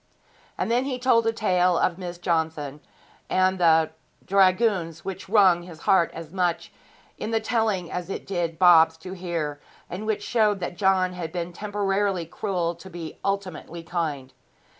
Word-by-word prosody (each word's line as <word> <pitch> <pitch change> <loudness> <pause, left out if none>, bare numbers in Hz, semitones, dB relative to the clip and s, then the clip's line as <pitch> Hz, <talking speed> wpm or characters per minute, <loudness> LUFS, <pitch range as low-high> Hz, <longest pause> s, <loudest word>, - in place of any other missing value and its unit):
And - - -1
then 245 +2 +2
he 265 -2 -2
told 235 -3 +3
a - - +3
tale 180 -5 +2
of 175 +1 +1
Miss 175 -1 -6
Johnson 160 -4 -2 0.5
and 185 0 +2
the 160 -2 +4
th - - -34
Dragoons 190 -3 +2
which 190 0 -6
wrung 190 -5 +5
his 175 -3 -12
heart 180 -4 +3
as 165 -1 -8
much 175 -2 -1 0.5
in - - -3
the 225 -1 +1
telling 220 -6 -1
as 180 0 -4
it - - -5
did 170 -4 -2
Bob's 165 -2 +6
to 180 +3 -8
hear, 165 -5 -4 0.3
and 200 +5 -5
which 210 -2 -1
showed 210 -4 +2
that 175 -1 -4
John 185 -1 +2
had 170 -3 -5
been 175 0 -4
temporarily 200 -2 -1
cruel 175 -1 -2
to 190 +2 -12
be 170 -3 -8
ultimately 185 -4 -3
kind. 155 -6 -3
180 Hz, 165 wpm, -25 LUFS, 165-195 Hz, 0.5 s, Bob's